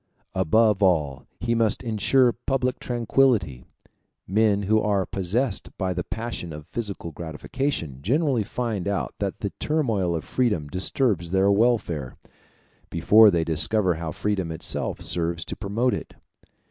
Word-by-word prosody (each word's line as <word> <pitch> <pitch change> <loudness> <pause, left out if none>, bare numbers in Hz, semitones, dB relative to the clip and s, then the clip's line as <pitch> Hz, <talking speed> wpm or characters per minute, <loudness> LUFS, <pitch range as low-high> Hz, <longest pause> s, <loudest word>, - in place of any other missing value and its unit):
Above 105 +3 +3
all 75 -8 +1
he 115 +1 0
must 115 -1 +1
insure 120 +3 +3
public 125 +1 -2
tranquillity: 120 - +1 0.6
men 105 +1 +2
who 110 +2 +2
are 100 -3 +1
possessed 100 +5 -1
by 95 -2 -1
the 90 - -3
passion 110 -7 -5
of 75 -1 -8
physical 100 -6 -5
gratification 80 - -4
generally 135 - +1
find 110 -3 -3
out 100 -2 -2
that 100 -2 -3
the 100 - -2
turmoil 110 - 0
of 80 - -3
freedom 105 -12 0
disturbs 90 - 0
their 95 +2 +3
welfare, 100 - +1 0.7
before 105 +6 +6
they 85 -4 +1
discover 85 +5 +1
how 80 -1 -5
freedom 95 -2 -2
itself 80 - -3
serves 85 -1 0
to - - -5
promote 115 +5 0
it. - - -6
100 Hz, 135 wpm, -24 LUFS, 85-115 Hz, 0.7 s, before